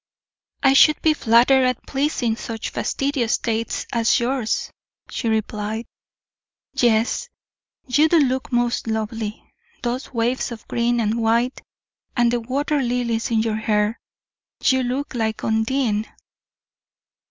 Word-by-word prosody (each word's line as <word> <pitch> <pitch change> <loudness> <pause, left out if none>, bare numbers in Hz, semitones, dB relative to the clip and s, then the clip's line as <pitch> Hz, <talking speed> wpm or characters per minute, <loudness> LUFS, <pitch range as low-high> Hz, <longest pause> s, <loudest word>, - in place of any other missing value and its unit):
"I 270 -1 +6
should 305 +2 +6
be 315 - +5
flattered 250 +1 +4
at 255 -2 0
pleasing 270 -5 0
such 225 -1 -5
fastidious 275 -4 0
taste 230 -1 -2
as 230 +1 +3
yours," 240 -2 -1 0.4
she 230 - -2
replied. 220 +1 -2 0.9
"Yes, 230 - +1 0.6
you 290 +5 +3
do 340 - +4
look 260 -3 +1
most 240 -1 0
lovely; 220 -1 -3 0.4
those 245 +2 -3
waves 245 +1 -1
of 230 -2 -9
green 240 0 +1
and 225 +1 0
white, 235 +3 +1 0.6
and 240 -1 +4
the 240 - +1
water 280 +5 -1
lilies 240 -2 -1
in 225 -2 +2
your 220 -1 -1
hair 215 0 0 0.6
you 260 -1 +3
look 255 +4 -3
like 220 -3 -2
Undine!" 220 -1 0
235 Hz, 125 wpm, -22 LUFS, 225-260 Hz, 0.9 s, I